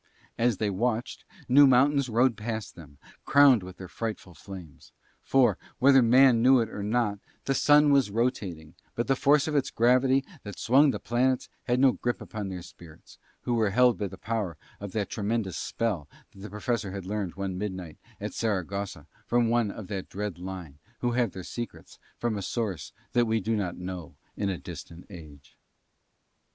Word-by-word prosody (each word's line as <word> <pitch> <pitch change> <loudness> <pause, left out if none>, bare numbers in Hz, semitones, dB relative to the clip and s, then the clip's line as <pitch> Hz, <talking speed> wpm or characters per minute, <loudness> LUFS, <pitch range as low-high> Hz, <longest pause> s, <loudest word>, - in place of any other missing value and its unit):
As 115 -3 +1
they 105 -2 -1
watched, 115 +4 -2 0.2
new 140 +3 +7
mountains 135 +1 +3
rode 120 +2 +3
past 110 -1 -5
them, 75 -4 -14 0.3
crowned 140 -5 +6
with 90 0 -10
their 95 - -8
frightful 105 -3 -5
flames; 90 -2 -12 0.3
for, 125 -7 +3 0.2
whether 135 0 +6
man 125 0 +5
knew 130 +1 +6
it 115 -2 -1
or 105 - -6
not, 105 -1 0 0.3
the 135 - +1
Sun 145 +1 +5
was 135 -6 +3
rotating, 100 -8 -2 0.2
but 120 - -1
the 135 - +2
force 145 +2 +3
of 155 - -2
its 140 - +1
gravity 130 +3 +3 0.2
that 105 -2 -9
swung 140 +5 +4
the - - -1
planets 125 +2 0 0.2
had 125 0 +1
no 135 0 +6
grip 120 0 -3
upon 105 -3 -6
spirits, 85 -3 -15 0.2
who 120 - -2
were 110 -3 +2
held 125 +3 +3
by 100 - -1
the 95 - -10
power 105 -7 -3 0.2
of 100 -1 -7
that 105 -3 -1
tremendous 105 -3 -2
spell 95 -11 -2 0.2
that - - -17
the 105 +2 -8
Professor 105 +1 -2
had 95 -1 -6
learned 100 -2 -3
one 95 -1 -3
midnight 95 -5 -5 0.2
at - - -5
Saragossa 100 -5 -3 0.2
from 120 -1 +2
one 120 -2 +2
of 105 0 -7
that 95 -1 -5
dread 100 -3 -5
line 90 -6 -8 0.2
who 120 - +1
have 120 -5 0
their 95 - -7
secrets 120 +5 -8 0.2
from 115 -3 -2
a - - -5
source 100 - -3 0.2
that 120 -1 +3
we 110 0 +1
do 110 +3 -1
not 95 -5 -2
know 90 -3 -7 0.2
in 100 - -1
a 95 - -2
distant 85 +3 -10
age. 75 -6 -13
110 Hz, 180 wpm, -27 LUFS, 95-125 Hz, 0.3 s, new